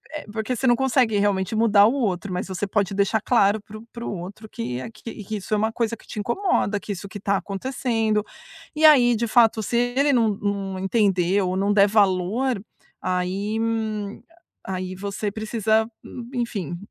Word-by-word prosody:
eh, 300 Hz, -, -6 dB
porque 220 Hz, +3 st, -2 dB
você 265 Hz, -, -3 dB
não 240 Hz, -1 st, +5 dB
consegue 245 Hz, -4 st, +2 dB
realmente 200 Hz, +1 st, 0 dB
mudar 215 Hz, -2 st, +5 dB
o 225 Hz, -, +3 dB
outro, 200 Hz, -8 st, -1 dB
mas 180 Hz, +2 st, -3 dB
você 190 Hz, +1 st, -3 dB
pode 200 Hz, -1 st, -1 dB
deixar 200 Hz, +2 st, +1 dB
claro 215 Hz, -2 st, +3 dB
para 215 Hz, +1 st, -11 dB
o 220 Hz, -, -13 dB
para 235 Hz, 0 st, -7 dB
o -, -, -3 dB
outro 205 Hz, +5 st, -9 dB
que 125 Hz, +2 st, -4 dB
é -, -, -6 dB
que 230 Hz, -, -9 dB, 0.3 s
isso 205 Hz, +2 st, -5 dB
é -, -, +3 dB
uma 220 Hz, +2 st, +1 dB
coisa 230 Hz, 0 st, -1 dB
que -, -, -21 dB
te -, -, -6 dB
incomoda, 235 Hz, -, 0 dB
que 205 Hz, -, -7 dB
isso 195 Hz, +1 st, -8 dB
que 205 Hz, -, -8 dB
tá 200 Hz, 0 st, +1 dB
acontecendo. 220 Hz, 0 st, -1 dB, 0.5 s
E 310 Hz, -, -2 dB
aí, 250 Hz, -6 st, +7 dB
de 235 Hz, +1 st, -1 dB
fato 225 Hz, -1 st, +4 dB
se 235 Hz, +3 st, -1 dB
ele 255 Hz, +4 st, +2 dB
não 230 Hz, -3 st, +3 dB
não 200 Hz, -2 st, -3 dB
entendeu 195 Hz, -2 st, +2 dB
ou 185 Hz, -, -2 dB
não 200 Hz, +2 st, +1 dB
der 205 Hz, 0 st, +5 dB
valor, 205 Hz, +4 st, +1 dB, 0.4 s
aí, 190 Hz, +4 st, -2 dB
hum 220 Hz, -2 st, -2 dB, 0.5 s
aí 185 Hz, -1 st, -4 dB
você 200 Hz, +2 st, -3 dB
precisa 220 Hz, +1 st, +1 dB, 0.2 s
hum 240 Hz, -1 st, -9 dB
enfim, 205 Hz, -, -3 dB
210 Hz, 190 wpm, -23 LUFS, 195-230 Hz, 0.5 s, aí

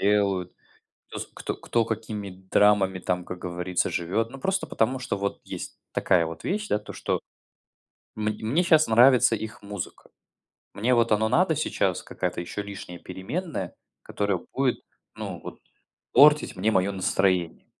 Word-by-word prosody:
делают, 100 Hz, -3 st, +2 dB, 0.6 s
кто -, -, -6 dB
с -, -, -4 dB
кто -, -, -4 dB
кто, 115 Hz, -1 st, 0 dB
какими 110 Hz, -2 st, -4 dB
драмами 95 Hz, 0 st, +2 dB
там, 90 Hz, 0 st, -2 dB
как 90 Hz, 0 st, -7 dB
говорится, 90 Hz, 0 st, -1 dB
живет. 100 Hz, +7 st, -1 dB
Ну 135 Hz, -, -9 dB
просто 190 Hz, +6 st, -1 dB
потому 125 Hz, +4 st, 0 dB
что 125 Hz, -5 st, -2 dB
вот 100 Hz, 0 st, -3 dB
есть -, -, -7 dB
такая 85 Hz, -3 st, +3 dB
вот 80 Hz, 0 st, -8 dB
вещь, 210 Hz, +2 st, -1 dB
да, -, -, +3 dB
то 105 Hz, -, -10 dB
что -, -, -1 dB, 1.0 s
мн 105 Hz, 0 st, 0 dB
мне 125 Hz, +11 st, +2 dB
щас 160 Hz, -3 st, +5 dB
нравится 120 Hz, +1 st, +6 dB
их 110 Hz, +2 st, -7 dB
музыка. 100 Hz, -3 st, -7 dB, 0.6 s
Мне 120 Hz, +5 st, +2 dB
вот 115 Hz, -1 st, +3 dB
оно 110 Hz, +1 st, +2 dB
надо 165 Hz, +3 st, +3 dB
сейчас, 155 Hz, -, 0 dB
какая-то -, -, -3 dB
ещё 95 Hz, +4 st, -5 dB
лишняя 95 Hz, -4 st, -8 dB
переменная, 95 Hz, -, -4 dB, 0.3 s
которая 100 Hz, -2 st, -1 dB, 0.2 s
будет 135 Hz, -2 st, +1 dB, 0.3 s
ну -, -, -6 dB
вот -, -, -9 dB, 0.5 s
портить 150 Hz, -4 st, +6 dB
мне 105 Hz, +4 st, +1 dB
мое 95 Hz, 0 st, +2 dB
настроение. 95 Hz, -2 st, 0 dB
105 Hz, 155 wpm, -26 LUFS, 95-120 Hz, 1.0 s, нравится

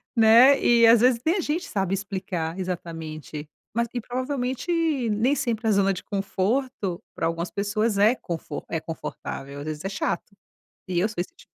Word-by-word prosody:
Né. 235 Hz, +5 st, +7 dB
E, 235 Hz, -1 st, +6 dB
às 230 Hz, 0 st, +7 dB
vezes 250 Hz, -1 st, +4 dB
nem 335 Hz, +5 st, +3 dB
a -, -, -1 dB
gente 330 Hz, +3 st, -2 dB
sabe 195 Hz, -2 st, -1 dB
explicar, 185 Hz, -4 st, -4 dB
exatamente. 160 Hz, -4 st, -5 dB, 0.3 s
Mas 235 Hz, 0 st, +1 dB
e -, -, +1 dB
provavelmente 255 Hz, +5 st, -3 dB, 0.4 s
nem 225 Hz, +6 st, +2 dB
sempre 235 Hz, -6 st, -1 dB
a -, -, +4 dB
zona 195 Hz, -1 st, +3 dB
de 185 Hz, -, -5 dB
conforto 200 Hz, 0 st, -1 dB, 0.2 s
pra -, -, 0 dB
algumas 165 Hz, +1 st, -1 dB
pessoas 210 Hz, +1 st, 0 dB
é 210 Hz, +4 st, +5 dB
confor 170 Hz, -7 st, -6 dB
é 165 Hz, -, -1 dB
confortável. 140 Hz, -3 st, -6 dB
Às 145 Hz, -, -6 dB
vezes 155 Hz, -1 st, -5 dB
é -, -, 0 dB
chato. 200 Hz, 0 st, -3 dB, 0.5 s
E 180 Hz, -2 st, -1 dB
eu 200 Hz, -, +3 dB
sou 220 Hz, -, -9 dB
esse 180 Hz, -, -3 dB
tipo. -, -, -18 dB
205 Hz, 180 wpm, -25 LUFS, 175-240 Hz, 0.5 s, Né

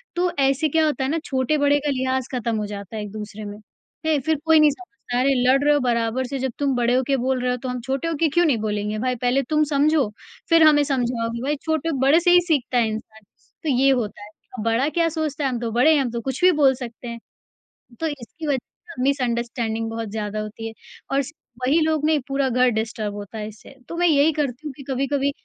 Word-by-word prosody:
तो 355 Hz, 0 st, +1 dB
ऐसे 275 Hz, +3 st, +2 dB
क्या 320 Hz, +2 st, +3 dB
होता 295 Hz, -3 st, 0 dB
है 265 Hz, -, -1 dB
ना, 325 Hz, +3 st, 0 dB
छोटे-बड़े 285 Hz, +2 st, +2 dB
का 290 Hz, 0 st, -2 dB
लिहाज़ 260 Hz, -1 st, -1 dB
ख़त्म 230 Hz, -2 st, -1 dB
हो 210 Hz, -, -2 dB
जाता 200 Hz, 0 st, -7 dB
है 215 Hz, -, -3 dB
एक-दूसरे 210 Hz, +1 st, -7 dB
में। 205 Hz, 0 st, -7 dB, 0.5 s
है? 310 Hz, -2 st, +2 dB
फिर 315 Hz, +4 st, 0 dB
कोई 320 Hz, -1 st, +6 dB
नहीं 305 Hz, -1 st, +6 dB
समझता 365 Hz, -7 st, -7 dB
है 250 Hz, -, +2 dB
अरे! 275 Hz, -, +3 dB, 0.2 s
लड़ 270 Hz, +2 st, +4 dB
रहे 295 Hz, 0 st, +4 dB
हो 290 Hz, -, +3 dB
बराबर 240 Hz, 0 st, 0 dB
से 275 Hz, +2 st, -4 dB
जब 260 Hz, 0 st, -1 dB
तुम 280 Hz, -2 st, +1 dB
बड़े 240 Hz, 0 st, +2 dB
हो 255 Hz, -, +3 dB
के 275 Hz, -, +2 dB
बोल 260 Hz, +1 st, 0 dB
रहे 250 Hz, 0 st, 0 dB
हो 250 Hz, -, -1 dB
तो 260 Hz, -, -3 dB
हम 250 Hz, 0 st, -3 dB
छोटे 265 Hz, +5 st, -2 dB
हो 330 Hz, -, -1 dB
के 330 Hz, -, +4 dB
क्यों 345 Hz, +4 st, +3 dB
नहीं 285 Hz, -7 st, +3 dB
बोलेंगे 210 Hz, 0 st, -2 dB
भाई? 255 Hz, +1 st, 0 dB
पहले 250 Hz, +3 st, +1 dB
तुम 305 Hz, 0 st, +3 dB
समझो, 290 Hz, -1 st, +3 dB, 0.4 s
फिर 330 Hz, -1 st, +6 dB
हमें 295 Hz, -2 st, +6 dB
समझाओ 245 Hz, -4 st, -1 dB
कि 235 Hz, -, -4 dB
भाई 285 Hz, +4 st, 0 dB
छोटो 320 Hz, 0 st, -1 dB
बड़े 275 Hz, +5 st, +5 dB
से 350 Hz, +1 st, +3 dB
ही 355 Hz, -, +8 dB
सीखता 265 Hz, -6 st, +1 dB
है 235 Hz, -2 st, +3 dB
इंसान, 220 Hz, 0 st, -7 dB, 0.4 s
तो 315 Hz, -, -1 dB
ये 270 Hz, 0 st, +4 dB
होता 225 Hz, -6 st, -1 dB
है। -, -, -10 dB, 0.3 s
अब 215 Hz, -, -4 dB
बड़ा 230 Hz, +5 st, +2 dB
क्या 335 Hz, +1 st, +1 dB
सोचता 310 Hz, -2 st, -3 dB
है 270 Hz, -, +2 dB
हम 245 Hz, -, -3 dB
तो 230 Hz, -1 st, -3 dB
बड़े 250 Hz, +8 st, +4 dB
हैं, 295 Hz, -, +3 dB
हम 250 Hz, -3 st, -2 dB
तो 235 Hz, 0 st, -3 dB
कुछ 265 Hz, +7 st, -4 dB
भी 365 Hz, -, +7 dB
बोल 270 Hz, -2 st, +6 dB
सकते 245 Hz, -1 st, -8 dB
हैं, 235 Hz, 0 st, -6 dB, 0.8 s
तो 325 Hz, -, 0 dB
इसकी 290 Hz, +2 st, -6 dB
वजह 280 Hz, -3 st, +1 dB
से 250 Hz, +1 st, -10 dB
मिसअंडरस्टैंडिंग 235 Hz, -4 st, -1 dB
बहुत 225 Hz, -1 st, -4 dB
ज़्यादा 215 Hz, 0 st, -3 dB
होती 215 Hz, +1 st, -6 dB
है -, -, -8 dB, 0.4 s
और 275 Hz, +1 st, +3 dB
स 280 Hz, +1 st, -9 dB, 0.3 s
वही 270 Hz, +6 st, +3 dB
लोग 310 Hz, -1 st, +1 dB
नहीं, 310 Hz, -2 st, +3 dB
पूरा 275 Hz, 0 st, +1 dB
घर 250 Hz, 0 st, +3 dB
डिस्टर्ब 220 Hz, -2 st, -3 dB
होता 205 Hz, +2 st, -8 dB
है 210 Hz, -, -4 dB
इससे। 215 Hz, 0 st, -14 dB, 0.2 s
तो 335 Hz, -, -6 dB
मैं 350 Hz, +1 st, +2 dB
यही 305 Hz, -1 st, +4 dB
करती 290 Hz, -1 st, -3 dB
हूँ 295 Hz, -, -4 dB
कि 280 Hz, -, -10 dB
कभी-कभी 275 Hz, +1 st, 0 dB
265 Hz, 250 wpm, -22 LUFS, 235-295 Hz, 0.8 s, ही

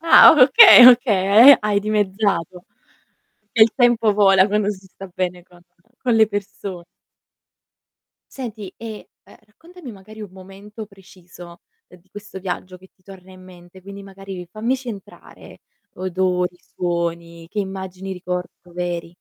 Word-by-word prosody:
Ah 330 Hz, 0 st, +7 dB
okay, 350 Hz, -, +8 dB
okay 230 Hz, -1 st, +5 dB
e -, -, +4 dB
hai 210 Hz, -1 st, -1 dB
dimezzato. 200 Hz, -4 st, -3 dB, 0.9 s
E 220 Hz, -, +4 dB
il 220 Hz, -, +3 dB
tempo 240 Hz, -4 st, +1 dB
vola 195 Hz, -2 st, +3 dB
quando 210 Hz, 0 st, -1 dB
si 195 Hz, -2 st, -11 dB
sta 195 Hz, 0 st, -13 dB
bene 180 Hz, -2 st, -5 dB
con 175 Hz, -1 st, -22 dB, 0.4 s
con 245 Hz, -3 st, -1 dB
le 220 Hz, -1 st, +3 dB
perso 200 Hz, -3 st, -8 dB, 1.5 s
Senti 215 Hz, -7 st, -9 dB
e, 220 Hz, -2 st, -11 dB
ehm, -, -, -20 dB
raccontami 330 Hz, +6 st, -15 dB
magari 215 Hz, +2 st, -15 dB
un 210 Hz, -3 st, -10 dB
momento 195 Hz, +3 st, -13 dB
preciso 185 Hz, -3 st, -17 dB, 0.3 s
di 180 Hz, +1 st, -22 dB
questo 205 Hz, -1 st, -11 dB
viaggio 185 Hz, 0 st, -7 dB
che 185 Hz, +1 st, -21 dB
ti 185 Hz, -, -38 dB
torna 190 Hz, -1 st, -16 dB
in 185 Hz, 0 st, -17 dB
mente, 180 Hz, 0 st, -17 dB
quindi 200 Hz, +1 st, -12 dB
magari 195 Hz, -2 st, -11 dB
fammici 250 Hz, +4 st, -4 dB
entrare: 205 Hz, 0 st, -15 dB, 0.3 s
odori, 180 Hz, -1 st, -3 dB
suoni, 170 Hz, -2 st, -6 dB
che 205 Hz, +4 st, -8 dB
immagini 190 Hz, -1 st, -7 dB
ricordo 180 Hz, -1 st, -8 dB
veri. 175 Hz, -1 st, -6 dB
195 Hz, 135 wpm, -19 LUFS, 180-215 Hz, 1.5 s, okay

